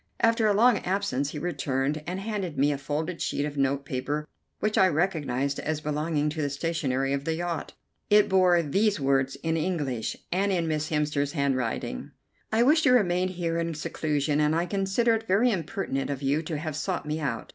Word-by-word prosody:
After 230 -1 +3
a 210 - +4
long 230 0 +5
absence 180 -8 -1
he 150 - -6
returned, 145 -3 -1
and 180 +2 -3
handed 195 -6 -3
to - - -5
me 145 +2 +4
a 140 - -2
folded 155 +5 -3
sheet 145 - -1
of 150 -1 -5
note 140 0 0
paper 145 +3 -3 0.3
which 215 0 0
I 190 - +6
recognized 145 -6 0
as 155 -1 -2
belonging 150 0 -1
to 155 0 -3
the 145 - 0
stationery 140 -3 -1
of 140 0 -1
the 160 +2 -1
yacht. 170 -2 -3 0.4
It 210 0 +6
bore 180 -3 +4
these 200 +6 +1
words 135 -1 +1
in 165 0 0
English, 150 -9 -2
and 195 +3 +1
in 170 -3 0
Miss 155 -1 -1
Hemster's 150 -2 0
handwriting: 130 - -2 0.4
"I 225 +2 +4
wish 305 +5 +5
to 285 - +4
remain 185 -7 +3
here 170 -2 -2
in 165 -1 -2
seclusion, 150 -1 -1
and 150 +1 +2
I 170 +1 +1
consider 195 +5 +1
it 225 0 -2
very 220 +7 +3
impertinent 165 -7 -2
of 140 -1 -4
you 140 +3 +1
to 160 -1 -4
have 155 0 -4
sought 175 +2 -2
me 150 +1 -2
out. 140 -7 -3
155 Hz, 200 wpm, -27 LUFS, 145-185 Hz, 0.4 s, I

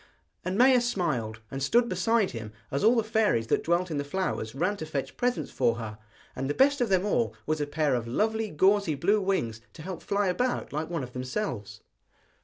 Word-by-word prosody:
And 185 +2 -2
Maia 255 +1 +6
smiled, 130 - -1
and 135 - -4
stood 235 - +3
beside 210 +2 +1
him 110 -2 -7 0.2
as 140 - -1
all 225 +3 +6
the 230 - +2
fairies 220 - +2
that - - +2
dwelt 175 +1 +1
in 150 - -1
the - - -1
flowers 145 -8 -3
ran 180 +8 0
to 160 - -5
fetch 140 -3 -4
presents 245 0 -1
for 115 - +2
her; 110 -2 -7 0.4
and 135 - -3
the 145 - -1
best 280 0 +4
of 240 - +1
them 190 0 +2
all 230 +3 0
was 155 0 -1
a 145 - -1
pair 150 -1 +1
of 120 -2 -1
lovely 220 - 0
gauzy 190 0 +3
blue 200 +9 +2
wings 120 - -1
to 155 - -10
help 185 0 -6
fly 200 0 0
about 245 - -1
like 155 +2 -2
one 165 -5 -2
of 125 0 -8
themselves. 125 - -4
175 Hz, 210 wpm, -28 LUFS, 135-215 Hz, 0.4 s, Maia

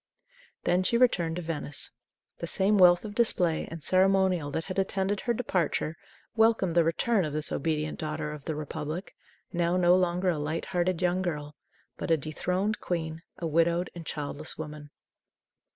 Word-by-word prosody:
Then 175 +1 +3
she 210 +5 +2
returned 180 -10 +3
to 180 - -4
Venice. 155 -3 -3 0.5
The 170 - -4
same 200 +4 +2
wealth 175 +2 +6
of 205 - -6
display 180 -8 +1
and 165 -3 -8
ceremonial 190 -4 +3
that 160 +3 -2
had 185 +2 -3
attended 195 +1 0
her 240 - 0
departure 180 -8 -1 0.4
welcomed 220 -6 +3
the 170 0 +5
return 190 +6 +1
of 150 -2 -3
this 155 0 -2
obedient 155 -1 -1
daughter 155 -1 -3
of 150 -2 -9
the 160 - -2
Republic, 155 +4 -5 0.4
now 175 0 +1
no 175 0 +5
longer 180 0 +1
a 165 -4 0
light 155 +3 -2
hearted 180 -2 0
young 180 +1 +2
girl, 150 -5 -3 0.4
but - - -4
a 165 - +5
dethroned 180 +8 -1
queen, 160 -2 -3 0.2
a 170 - -4
widowed 170 +2 +2
and 170 - -8
childless 150 +1 -4
woman. 150 -1 -7
175 Hz, 170 wpm, -28 LUFS, 155-185 Hz, 0.5 s, wealth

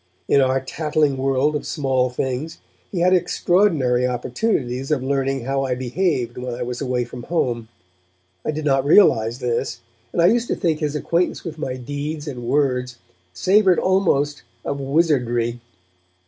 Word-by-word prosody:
In 140 - +4
our 130 0 +2
tattling 150 +1 0
world 135 +3 +1
of 150 - -2
small 130 -4 0
things 130 +5 -3 0.3
he 180 - -2
had 180 +1 +4
extraordinary 175 -8 +2
opportunities 125 - -2
of 145 -4 0
learning 135 0 0
how 135 +1 0
I 130 -2 -1
behaved 125 -2 -1
when 125 -1 -4
I - - -4
was 125 +2 -5
away 125 -2 0
from 125 - -9
home; 120 -6 -1 0.8
I - - -3
did 155 0 -3
not 135 -2 +3
realize 120 - +4
this, 120 -1 -2 0.3
and - - -3
I 170 - +5
used 235 +5 +3
to - - 0
think 165 -5 0
his 150 -2 -2
acquaintance 170 +4 0
with 160 -3 -7
my 130 -4 -3
deeds 145 +4 -5
and 125 -4 -6
words 125 -3 0 0.3
savoured 185 - +3
almost 155 -7 +1 0.2
of 140 - -2
wizardry. 125 -5 +1
135 Hz, 160 wpm, -21 LUFS, 125-155 Hz, 0.8 s, I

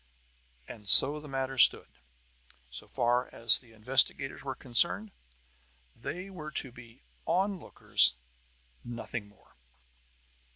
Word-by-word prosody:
And 105 -3 -12
so 145 +8 +5
the 150 - -13
matter 135 -1 -5
stood, - - +5 0.7
so 60 - -10
far 120 +1 -1
as 115 -1 +3
the 120 -3 -20
investigators 130 +4 +1
were 135 -1 -6
concerned. 170 - 0 0.8
They 180 +2 -8
were 155 -5 -9
to 135 - -4
be 120 0 -17 0.2
lookers 180 - 0 0.7
on, 120 - -9
nothing 115 -2 -8
more. 105 -1 -26
130 Hz, 115 wpm, -28 LUFS, 115-150 Hz, 0.8 s, so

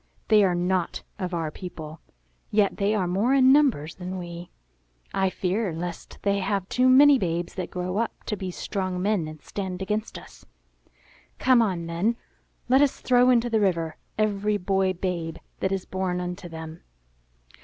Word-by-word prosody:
They 215 -2 +6
are 180 -2 +2
not 180 0 -1 0.2
of 185 -2 -3
our 165 -3 -2
people; 160 -2 -8 0.5
yet 205 -2 +2
they 205 +1 +1
are 195 -3 +1
more 200 +9 +2
in 260 -1 +6
numbers 250 - +3
than 185 +1 -6
we. 175 -1 -7 0.6
I 190 -1 +2
fear 190 +2 -1
lest 170 +1 -6
they 200 0 +2
have 195 -1 -1
too 255 +1 +3
many 280 +1 +7
babes 175 -1 -2
that 185 -2 -4
grow 180 +1 -3
up 230 0 -2
to 210 - -3
be 190 -2 -5
strong 185 0 -3
men 195 -4 0
and 155 -1 -10
stand 190 -2 -5
against 210 +3 -3
us. - - -14 0.9
Come 255 -2 +4
on 185 -6 0
then; 175 +8 0 0.5
let 265 +2 +5
us 285 -2 +2
throw 250 0 +4
into 240 -1 +4
the 225 -2 +1
river 170 -6 0 0.2
every 210 -1 +1
boy 190 0 +1
babe 170 -3 -3 0.2
that 190 - 0
is 195 -1 -2
born 185 -1 -2
unto 180 0 -5
them." 160 0 -8
190 Hz, 170 wpm, -25 LUFS, 175-215 Hz, 0.9 s, many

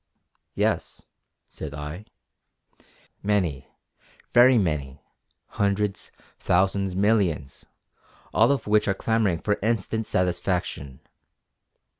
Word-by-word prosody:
"Yes" - - -1 0.4
said 70 -2 -8
I, 75 +7 -7 1.2
"many, 95 -10 0 0.6
very 125 +1 +6
many, 75 -8 -1 0.5
hundreds, 100 0 -1 0.3
thousands, 95 +1 +1
millions, 95 -9 0 0.7
all - - +4
of 140 - -1
which 105 0 +2
are 100 - +1
clamouring 105 -6 0
for 105 -1 0
instant 110 0 -1
satisfaction!" 90 -7 -2
95 Hz, 85 wpm, -25 LUFS, 80-105 Hz, 1.2 s, very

